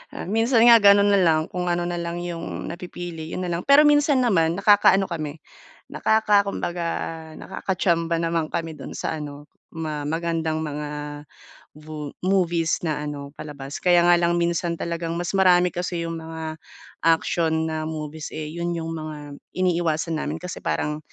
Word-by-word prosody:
Ah, - - -5
minsan 225 +4 +3
nga 235 -1 +9
gano'n 200 0 +6
na 200 - +4
lang, 160 -4 +4
kung 180 -1 -3
ano 175 0 0
na 175 0 -3
lang 170 +1 -4
'yong 170 -2 -5
napipili, 175 -2 -7
'yon 185 - -3
na 180 - -3
lang. 170 +1 -2
Pero 280 +2 +8
minsan 290 -3 +4
naman 170 -8 +2
nakakaano 200 -1 +5
kami, 155 -2 -5 0.5
nakaka 210 -2 +3
kumbaga 175 -3 -3 0.5
nakaka 190 0 -4
chamba 170 -2 +1
naman 165 -1 0
kami 165 0 -3
do'n - - -8
sa 160 - -3
ano, 145 0 -9 0.2
ma 155 -3 -4
magandang 160 -1 -1
mga 150 -1 -4 0.9
vo 150 -1 -7 0.2
movies 175 -4 +1
na 150 -2 -2
ano, 140 -1 -6
palabas. 140 -2 -7
Kaya 175 -1 +4
nga 175 0 +5
lang 170 0 +2
minsan 170 0 0
talagang 170 0 -3
mas 175 0 -3
marami 180 -1 +5
kasi 175 -1 -3
'yong 165 0 -4
mga 160 0 -7 0.6
action 165 -1 +2
na 155 0 -3
movies, 155 -1 -6
eh, 155 -1 -5
'yon 170 +1 -3
'yong 165 -1 -4
mga 150 -3 -7 0.2
iniiwasan 170 -3 0
namin. 155 +2 -4
Kasi 180 +1 -6
parang, 150 0 -2
170 Hz, 165 wpm, -23 LUFS, 155-180 Hz, 0.9 s, nga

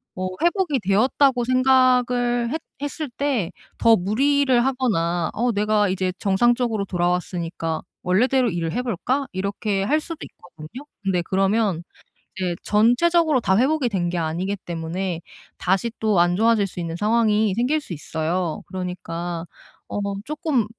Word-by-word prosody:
어 185 0 -3
회복이 345 -5 +1
되었다고 250 +5 +3
생각을 250 -1 +3
했 320 - -3 0.2
했을 290 0 -4
때 245 -9 -1 0.3
더 230 -1 +5
무리를 260 +5 +2
하거나 175 -11 0
어 240 +2 +1
'내가 210 -1 +2
이제 185 -1 -1
정상적으로 225 +1 +1
돌아왔으니까 175 -2 -2 0.2
원래대로 245 +7 +2
일을 165 -2 -2
해 250 - 0
볼까?' 255 +5 -1
이렇게 200 +1 -1
할 300 +9 +2
수도 330 -1 -7
있거든요. 175 - -12 0.2
근데 185 -3 +1
그러면 195 -1 +1 0.6
이제 180 -2 -1
전체적으로 280 +8 +3
다 190 -1 +2
회복이 270 +1 +2
된 180 -5 -1
게 175 - -3
아니기 170 +5 -2
때문에 170 +1 -4 0.4
다시 195 +6 +1
또 215 -5 +2
안 175 0 +3
좋아질 225 -1 +3
수 180 - -9
있는 165 -1 -4
상황이 215 0 +2
생길 255 +7 +1
수 180 - -8
있어요. 160 +2 -3
그러니까 175 -2 -5 0.4
어 - - -4 0.3
조금 295 -6 0
210 Hz, 310 characters per minute, -22 LUFS, 180-250 Hz, 0.6 s, 더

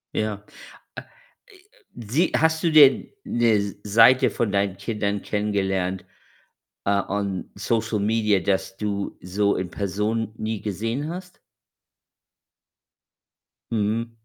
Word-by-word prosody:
Ja. 105 -1 -2 0.6
Ä - - -12 0.5
i 380 - -18 0.5
sie 160 +8 +3
hast 160 +1 +2
du 165 - +2
denn 145 -4 +6 0.2
'ne 110 -4 +1
Seite 115 +5 +6
von 110 -4 -1
deinen 100 -1 0
Kindern 100 -1 -2
kennengelernt, 95 -3 -1 0.8
äh, 100 - +2 0.2
on 100 -2 -3
Social 110 +1 -1
Media, 105 -2 +2
das 95 +1 -1
du 100 -2 -3
so 100 +3 0
in 90 -2 -4
Person 105 +3 -2
nie 110 -1 -3
gesehen 115 - -3
hast? 180 +1 -9 2.3
Mhm. 115 +2 -1
105 Hz, 110 wpm, -24 LUFS, 100-115 Hz, 2.3 s, denn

